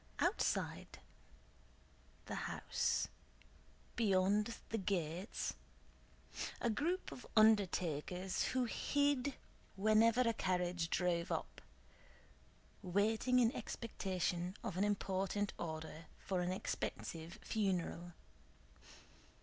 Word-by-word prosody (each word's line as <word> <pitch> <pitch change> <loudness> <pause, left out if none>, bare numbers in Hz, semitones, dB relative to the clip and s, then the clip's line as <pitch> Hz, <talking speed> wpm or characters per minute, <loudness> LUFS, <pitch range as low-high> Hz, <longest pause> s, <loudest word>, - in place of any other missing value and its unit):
Outside - - 0 1.3
the - - -5 0.2
house, - - 0 0.9
beyond 205 +1 +3
the 225 - -1
gates, 180 0 -1 1.1
a 235 - +1
group 340 - -1
of 250 - -9
undertakers, 185 -4 +3
who 255 -1 +1
hid 285 +2 +1 0.4
whenever 215 +4 +5
a 230 -2 +3
carriage 180 -4 0
drove 175 -1 +1
up, - - -3 1.2
waited 215 +7 +2
in 235 -2 +5
expectation 185 -5 -2
of 190 - -3
an 190 - +2
important 200 0 0
order 160 0 -5
for 185 -2 -1
an 180 +1 0
expensive 165 -3 -3
funeral. 180 -4 -1
195 Hz, 85 wpm, -38 LUFS, 180-225 Hz, 1.3 s, whenever